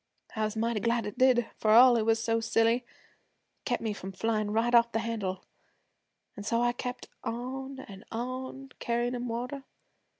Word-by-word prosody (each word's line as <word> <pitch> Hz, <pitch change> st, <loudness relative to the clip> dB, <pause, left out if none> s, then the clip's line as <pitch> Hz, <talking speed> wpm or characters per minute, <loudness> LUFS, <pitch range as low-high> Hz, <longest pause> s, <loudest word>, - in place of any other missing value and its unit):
'I 220 Hz, 0 st, +1 dB
was 215 Hz, +1 st, -3 dB
mighty 230 Hz, 0 st, 0 dB
glad 235 Hz, +2 st, 0 dB
it 210 Hz, -, -5 dB
did. 250 Hz, -3 st, +4 dB
For 215 Hz, -, 0 dB
all 240 Hz, +3 st, +8 dB
it 225 Hz, -1 st, +1 dB
was 225 Hz, 0 st, +4 dB
so 225 Hz, 0 st, 0 dB
silly, 225 Hz, +1 st, +3 dB
it 245 Hz, -, -12 dB, 0.8 s
kept 245 Hz, -2 st, -1 dB
me 220 Hz, -2 st, -1 dB
from 195 Hz, -1 st, -7 dB
flyin' 215 Hz, +1 st, 0 dB
right 225 Hz, +3 st, +1 dB
off 235 Hz, 0 st, +6 dB
the -, -, 0 dB
handle. 215 Hz, -5 st, -3 dB, 0.9 s
An' -, -, -7 dB
so 230 Hz, +3 st, 0 dB
I 240 Hz, -, +3 dB
kept 250 Hz, 0 st, -6 dB, 0.2 s
on 265 Hz, +3 st, -5 dB
an' 195 Hz, -4 st, -11 dB
on, 260 Hz, +3 st, -5 dB
carryin' 240 Hz, +1 st, 0 dB
'em 245 Hz, 0 st, -3 dB
water. 250 Hz, +4 st, -4 dB
230 Hz, 180 wpm, -29 LUFS, 225-245 Hz, 0.9 s, all